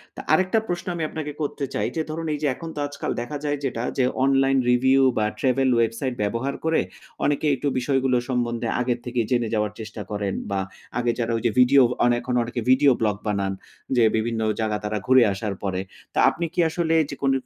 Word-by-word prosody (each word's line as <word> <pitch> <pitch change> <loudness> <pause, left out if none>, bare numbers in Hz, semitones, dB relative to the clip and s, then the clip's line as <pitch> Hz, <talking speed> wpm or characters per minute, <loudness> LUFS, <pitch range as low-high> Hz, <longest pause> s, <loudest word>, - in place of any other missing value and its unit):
তো - - -9
আরেকটা 185 +4 +3
প্রশ্ন 175 0 -3
আমি 165 - -3
আপনাকে 150 -2 -5
করতে 145 -1 -2
চাই - - 0
যে, 160 - 0
ধরুন 165 +1 -4
এই 150 - -3
যে - - +3
এখন 165 - -8
তো - - -4
আজকাল 145 - -4
দেখা 145 +5 -5
যায় 145 0 0
যেটা 120 -3 -2
যে 130 - +3 0.2
অনলাইন 135 0 +3
রিভিউ 130 +2 +4 0.2
বা 105 - +2
ট্রাভেল 130 0 +2
ওয়েবসাইট 115 +3 0
ব্যবহার 115 +7 -2
করে 160 0 +3 0.4
অনেকে 145 +1 +1
একটু 145 - -3
বিষয়গুলো 130 0 +1
সম্বন্ধে 120 -2 -1
আগের 120 -1 0
থেকে 120 0 -2
জেনে 120 -2 +2
যাওয়ার 105 -1 0
চেষ্টা 110 0 -7
করেন। 100 -2 -2 0.2
বা 100 - 0 0.4
আগে 120 -1 +1
যারা 115 0 0
ওই - - -4
যে 115 - +3
ভিডিও 135 +2 +6 0.2
আন 120 - +4
এখন 125 - -4
অনেকে 120 +1 -4
ভিডিও 135 +2 +6
ব্লগ 105 -2 +2
বানান 100 -2 0 0.4
যে 120 - +4
বিভিন্ন 110 0 -1 0.2
জায়গা 110 -1 0
তারা 105 0 -2
ঘুরে 130 -1 +7
আসার 100 +1 -3
পরে। 95 -1 -1 0.3
তো - - -7
আপনি 170 - -3
কি 180 - -4
আসলে 165 0 0
যেকুন 140 -1 -1
125 Hz, 205 wpm, -24 LUFS, 115-145 Hz, 0.4 s, ঘুরে